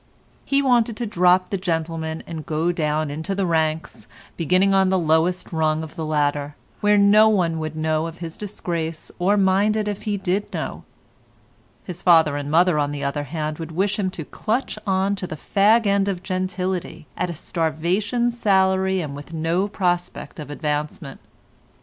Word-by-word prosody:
He 280 0 +2
wanted 240 -4 +2
to 240 - -2
drop 180 -2 +3
the 195 - -1
gentleman 160 -2 -2
and 160 -2 -6
go 160 +3 0
down 155 -2 -1
into 160 +7 -3
the 195 -1 0
ranks, 160 -2 -1 0.3
beginning 185 +4 +2
on 190 -1 +4
the 190 - +2
lowest 170 +2 +1
rung 155 -1 +1
of 160 - -9
the 160 - -4
ladder, 145 -1 0 0.2
where 210 0 +4
no 210 +2 +6
one 170 -6 +1
would 155 0 -4
know 155 0 0
of 165 0 -9
his 165 -2 -7
disgrace 170 -6 -4
or 195 +4 +3
mind 200 +2 +3
it 210 -1 -1
if 205 -1 -3
he 210 -2 -2
did 195 +2 -2
know; - - -5 1.0
his 180 -2 -8
father 160 -5 +5
and 145 0 -4
mother 170 0 +4
on 145 -1 +1
the 145 -1 -5
other 145 +1 -2
hand 155 +1 -4
would 165 0 -6
wish 200 +5 0
him 190 -2 0
to 170 -4 -7
clutch 220 - -2
on 190 +1 +1
to 185 - -4
the 155 - -5
fag 215 +8 +3
end 200 0 +2
of 185 -2 -3
gentility 185 -3 -3
at 180 - -2
a 170 - -5
starvation 180 +11 -1
salary 190 -4 +2
and 145 -3 -5
with 145 +4 -10
no 165 +4 0
prospect 175 -4 -2
of 150 - -7
advancement. 150 -1 -4
175 Hz, 180 wpm, -22 LUFS, 155-195 Hz, 1.0 s, no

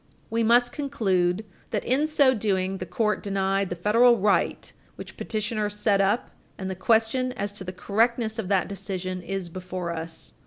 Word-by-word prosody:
We 230 +1 +1
must 240 +2 +4
conclude 205 - 0 0.2
that, - - -2
in 275 +5 +2
so 285 -4 +4
doing, 195 -4 -1
the 185 - -5
court 210 +5 0
denied 195 -1 0
the 180 - -3
federal 230 +7 +4
right 205 0 +1 0.2
which - - -10
petitioner 215 -1 -2
set 205 -1 +1
up 200 +4 +1 0.3
and 190 -1 -4
the - - -4
question 230 +6 +2
as 200 -3 -3
to 200 -1 -8
the 185 - -5
correctness 220 +4 0
of 205 - -3
that 195 -1 +2
decision 185 -2 -4
is 190 0 -4
before 180 0 -5
us. 165 0 -6
200 Hz, 170 wpm, -26 LUFS, 185-230 Hz, 0.3 s, must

